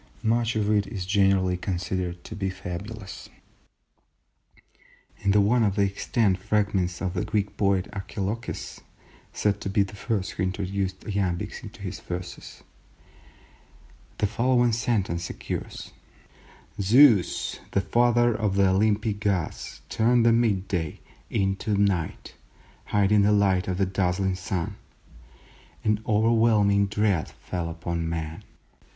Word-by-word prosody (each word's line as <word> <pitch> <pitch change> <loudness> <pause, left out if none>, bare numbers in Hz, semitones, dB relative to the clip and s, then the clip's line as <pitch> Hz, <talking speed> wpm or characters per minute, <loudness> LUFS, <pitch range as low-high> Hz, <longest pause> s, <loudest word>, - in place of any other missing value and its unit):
Much 115 +1 +1
of 105 -2 0
it 105 -2 +2
is 95 -3 -5
generally 95 -2 +3
considered 90 -1 -3
to - - -8
be 95 -1 -2
fabulous. 95 +3 -7 1.9
In 100 - +1
one 120 +2 +3
of 100 -3 +1
the 100 - +3
extant 100 0 +1
fragments 95 -4 0
of 90 -2 -1
the 90 - -1
Greek 100 -1 -1
poet 95 -1 +1
Archilochus 100 +3 -5 0.5
(said 105 -1 0
to - - -3
be 100 +1 +3
the 100 - -9
first 100 -1 -2
who - - -6
introduced 95 0 -2
iambics 95 -4 -2
into - - -11
his - - -5
verses), 90 +1 -7 1.5
the - - +1
following 120 +3 +2
sentence 105 -7 -1
occurs:—"Zeus 110 0 0
the 100 - +1
father 120 +2 +3
of 105 -3 -1
the 100 -1 +4
Olympic 105 +2 +1
Gods 100 -5 -2
turned 120 +1 +3
mid 115 -5 +3
day 85 -5 -2 0.3
into 100 0 0
night 95 -5 0 0.5
hiding 105 0 +3
the 100 +1 +4
light 100 -3 +3
of 90 -1 -1
the 95 - +2
dazzling 95 0 0
sun; 90 -2 -3 1.1
an 105 0 +1
overwhelming 110 -2 +3
dread 100 -5 0
fell 85 -2 -5
upon 85 0 -3
men." 80 -1 -4
100 Hz, 120 wpm, -26 LUFS, 95-110 Hz, 1.9 s, the